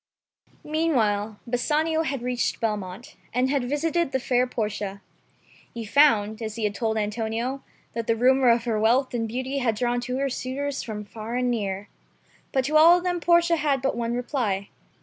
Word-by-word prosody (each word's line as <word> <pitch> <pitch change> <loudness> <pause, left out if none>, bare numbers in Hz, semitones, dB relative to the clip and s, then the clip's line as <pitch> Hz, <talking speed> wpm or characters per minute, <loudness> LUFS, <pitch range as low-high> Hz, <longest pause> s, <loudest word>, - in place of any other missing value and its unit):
Meanwhile 225 -10 0
Bassanio 305 +6 +1
had 275 -6 -3
reached 250 -1 -1
Belmont, 210 -1 -4 0.2
and 255 +1 +2
had 265 -4 0
visited 325 +2 0
the 265 - 0
fair 250 0 +1
Portia. 210 -4 -3 0.8
He 230 -1 -5
found, 220 -3 +3
as 220 -1 -4
he 230 - -4
had 210 -1 0
told 220 0 -1
Antonio, 225 +5 -2 0.3
that 230 -1 -4
the 230 - +3
rumor 255 +2 +4
of 235 0 +3
her 225 -3 0
wealth 245 +5 +2
and 230 -2 -1
beauty 260 +4 -3
had 235 -4 +1
drawn 245 +2 0
to 250 +1 -3
her 275 +1 0
suitors 275 +2 -3
from 210 -2 -6
far 220 +3 -6
and 250 0 +1
near. 200 -3 -3 0.6
But 265 -1 +1
to 305 +3 +3
all 335 +3 +8
of 355 - -5
them 355 -1 0
Portia 340 0 +4
had 290 -3 +1
but 270 - 0
one 235 0 -2
reply. 235 -6 -2
245 Hz, 180 wpm, -25 LUFS, 220-275 Hz, 0.8 s, all